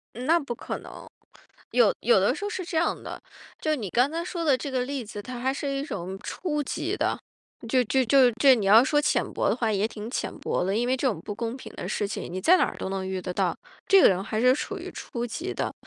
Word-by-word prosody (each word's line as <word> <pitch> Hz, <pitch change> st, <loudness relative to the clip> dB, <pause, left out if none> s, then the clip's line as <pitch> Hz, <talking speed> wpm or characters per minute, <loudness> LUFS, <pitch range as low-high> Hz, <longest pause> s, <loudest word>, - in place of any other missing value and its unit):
嗯， 245 Hz, +2 st, -6 dB
那 335 Hz, +2 st, +5 dB
不 275 Hz, -6 st, -4 dB
可 -, -, -5 dB
能， -, -, -11 dB, 0.7 s
有 485 Hz, -, +4 dB
有 485 Hz, -, +4 dB
的 -, -, +2 dB
时 410 Hz, -, -6 dB
候 410 Hz, -, -2 dB
是 375 Hz, -3 st, -4 dB
这 340 Hz, -1 st, -5 dB
样 330 Hz, -, +1 dB
的， -, -, -8 dB, 0.4 s
就 310 Hz, -1 st, +1 dB
你 225 Hz, -8 st, -4 dB
刚 250 Hz, +7 st, +3 dB
刚 335 Hz, +2 st, -3 dB
说 345 Hz, -2 st, -4 dB
的 280 Hz, -5 st, +4 dB
这 280 Hz, -, -5 dB
个 260 Hz, -1 st, 0 dB
例 270 Hz, -1 st, -4 dB
子， 210 Hz, -1 st, -7 dB
它 250 Hz, +3 st, -7 dB
还 260 Hz, +2 st, 0 dB
是 280 Hz, +1 st, -3 dB
一 275 Hz, 0 st, -2 dB
种 190 Hz, -, -5 dB
初 300 Hz, -5 st, -2 dB
级 -, -, -3 dB
的， -, -, 0 dB, 0.5 s
就 255 Hz, +1 st, +3 dB
就 260 Hz, +3 st, +2 dB
就 255 Hz, +1 st, +5 dB
这 260 Hz, +3 st, +6 dB
你 220 Hz, -5 st, -2 dB
要 215 Hz, +4 st, +8 dB
说 295 Hz, +3 st, +2 dB
浅 295 Hz, -, +2 dB
薄 -, -, 0 dB
的 -, -, +1 dB
话 230 Hz, -3 st, 0 dB
也 205 Hz, 0 st, +1 dB
挺 220 Hz, 0 st, -7 dB
浅 -, -, -3 dB
薄 -, -, -1 dB
的， 195 Hz, +2 st, 0 dB
因 235 Hz, +2 st, +1 dB
为 260 Hz, -, +2 dB
这 265 Hz, -, -1 dB
种 185 Hz, -8 st, -5 dB
不 205 Hz, -, -5 dB
公 230 Hz, +3 st, -4 dB
平 -, -, -10 dB
的 -, -, -5 dB
事 205 Hz, 0 st, -1 dB
情， 200 Hz, -4 st, -5 dB
你 185 Hz, -, -3 dB
在 350 Hz, -, +6 dB
哪 -, -, +3 dB
儿 -, -, -4 dB
都 -, -, -4 dB
能 190 Hz, -1 st, -3 dB
遇 190 Hz, 0 st, -3 dB
得 180 Hz, 0 st, -4 dB
到， -, -, 0 dB, 0.3 s
这 390 Hz, -1 st, +7 dB
个 -, -, +8 dB
人 190 Hz, -1 st, +1 dB
还 215 Hz, 0 st, -2 dB
是 250 Hz, +2 st, +5 dB
属 405 Hz, +8 st, -4 dB
于 370 Hz, +1 st, -7 dB
初 240 Hz, -8 st, -5 dB
级 345 Hz, +11 st, -4 dB
的， -, -, -3 dB
255 Hz, 290 characters per minute, -26 LUFS, 210-295 Hz, 0.7 s, 要